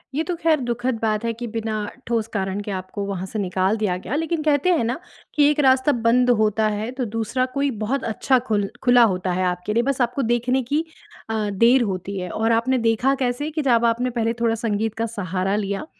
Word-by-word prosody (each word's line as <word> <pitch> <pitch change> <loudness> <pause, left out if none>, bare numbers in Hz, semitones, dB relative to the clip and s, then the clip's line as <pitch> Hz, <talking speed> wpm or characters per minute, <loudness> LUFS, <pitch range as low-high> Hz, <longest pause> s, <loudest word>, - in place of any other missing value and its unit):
ये 315 - +1
तो 355 0 -3
ख़ैर 315 -2 +3
दुखद 245 0 -1
बात 215 0 0
है 230 - +1
कि 240 +2 -6
बिना 225 -1 -2 0.3
ठोस 230 -2 0
कारण 195 0 -2
के 205 - -5
आपको 190 +2 -4
वहाँ 190 -2 -4
से 215 +3 -5
निकाल 190 +2 0
दिया 200 -4 0
गया 240 +9 -5
लेकिन 325 0 -1
कहते 300 +3 +2
हैं 275 - +1
ना 240 +7 -2 0.4
कि 295 -1 +5
एक 300 - -2
रास्ता 265 +1 +4
बंद 245 +1 +2
होता 215 0 +2
है 210 +2 -3
तो 250 - +1
दूसरा 235 +3 0
कोई 280 0 +1
बहुत 270 +4 -1
अच्छा 250 +3 +1
खुल 205 -2 +1
खुला 245 -1 +6
होता 185 0 -3
है 185 +1 0
आपके 180 +3 -2
लिए 235 +1 +2
बस 275 -1 -1
आपको 245 +3 0
देखने 250 +2 +1
की 295 +6 0 0.5
अ, 215 -2 -1
देर 235 +6 +4
होती 195 -1 -4
है। 180 -1 -4
और 225 +4 0
आपने 245 +3 +2
देखा 245 +5 +2
कैसे 250 +5 -1
कि 310 0 -2
जब 235 0 +4
आपने 240 +2 +1
पहले 230 -1 -1
थोड़ा 230 -1 +2
संगीत 220 -1 -1
का 225 0 -1
सहारा 195 -3 -2
लिया, 200 +4 -2
230 Hz, 220 wpm, -22 LUFS, 205-255 Hz, 0.5 s, खुला